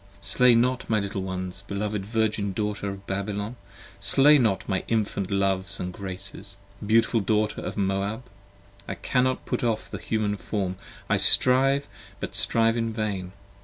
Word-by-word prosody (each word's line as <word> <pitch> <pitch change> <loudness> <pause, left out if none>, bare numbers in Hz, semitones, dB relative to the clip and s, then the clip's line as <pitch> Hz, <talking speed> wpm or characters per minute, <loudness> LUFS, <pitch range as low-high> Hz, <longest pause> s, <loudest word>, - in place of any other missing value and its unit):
Slay 120 +5 +5
not 125 +2 +1
my 110 -1 +2
little 100 -1 -3
ones, 95 0 -5
beloved 100 0 -3
Virgin 110 -3 -1
daughter 105 -1 -3
of 100 0 -8
Babylon, 100 +3 -3 0.4
Slay 145 +2 +5
not 100 -6 0
my 95 -2 -1
infant 105 -4 -1
loves 95 0 0
& - - -5
graces, 100 +1 -4 0.3
beautiful 115 +2 +3
daughter 105 +1 0
of - - -6
Moab. 100 +4 -1 0.6
1 - - -6
cannot 130 0 0
put - - -2
off 115 -2 -1
the - - -5
human 105 -2 -1
form, 95 -3 -3 0.3
I - - +2
strive 135 +2 +5 0.3
but - - -5
strive 115 0 +3
in 115 -1 -1
vain. 100 -4 -3
105 Hz, 150 wpm, -25 LUFS, 100-115 Hz, 0.6 s, Slay